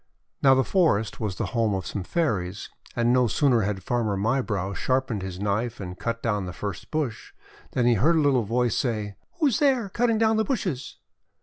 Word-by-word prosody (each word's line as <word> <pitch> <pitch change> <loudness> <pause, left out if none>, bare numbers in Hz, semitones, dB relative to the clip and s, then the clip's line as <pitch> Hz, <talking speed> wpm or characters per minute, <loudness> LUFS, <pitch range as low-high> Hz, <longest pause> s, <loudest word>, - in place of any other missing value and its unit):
Now 135 -1 +6
the 130 - +3
forest 115 - +1
was 105 -4 -2
the - - -2
home 115 -4 +1
of 95 -3 -4
some 100 - -4
Fairies; 105 - -2 0.2
and 120 0 +2
no 125 -1 +4
sooner 125 -1 +3
had 100 -2 -2
Farmer 110 -4 0
Mybrow 105 -3 -1
sharpened 130 +1 -1
his 95 -1 -6
knife 105 +4 -1
and 90 -2 -7
cut 115 0 -3
down 105 -5 -1
the 90 - -6
first 100 +3 -6
bush, 150 -8 -3 0.4
than 125 - +1
he 120 - +5
heard 145 +11 +3
a - - +3
little 140 -4 +3
voice 120 +1 0
say: 105 -5 -2
— - - -54
'Who 325 - +1
is 260 -7 +2
there, 260 -8 +2
cutting 230 +2 +1
down 220 0 +3
the 220 - +3
bushes?' 185 - -3
120 Hz, 205 wpm, -25 LUFS, 100-145 Hz, 0.4 s, Now